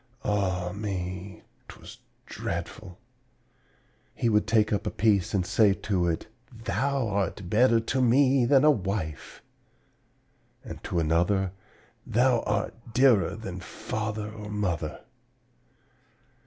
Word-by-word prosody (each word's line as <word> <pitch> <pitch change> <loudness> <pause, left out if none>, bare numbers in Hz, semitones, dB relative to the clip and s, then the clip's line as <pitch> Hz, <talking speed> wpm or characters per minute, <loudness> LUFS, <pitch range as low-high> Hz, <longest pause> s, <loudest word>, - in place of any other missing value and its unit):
Ah, 95 -3 0
me, 95 -2 -5 0.2
'twas - - -12 0.3
dreadful! 90 -2 -6 1.2
He 120 - +1
would 105 -1 +2
take 110 -1 +3
up 100 - -1
a - - +2
piece 105 -1 +1
and 90 -2 +1
say 100 +1 +3
to 95 -4 -1
it, 85 -1 -2 0.3
'Thou 130 +2 -1
art 100 -2 -2
better 115 +1 +4
to 125 +3 -1
me 130 +1 +4
than 135 +2 +4
a 150 - +7
wife'; 95 - -4 1.2
and - - -9
to 90 - -2
another, 85 +4 +1 0.6
'Thou 120 +1 +3
art 100 -1 -1 0.2
dearer 125 -7 +4
than 95 -5 -7
father 110 +3 -5
or 105 -1 -9
mother!' 90 -7 -2
105 Hz, 115 wpm, -27 LUFS, 95-115 Hz, 1.2 s, a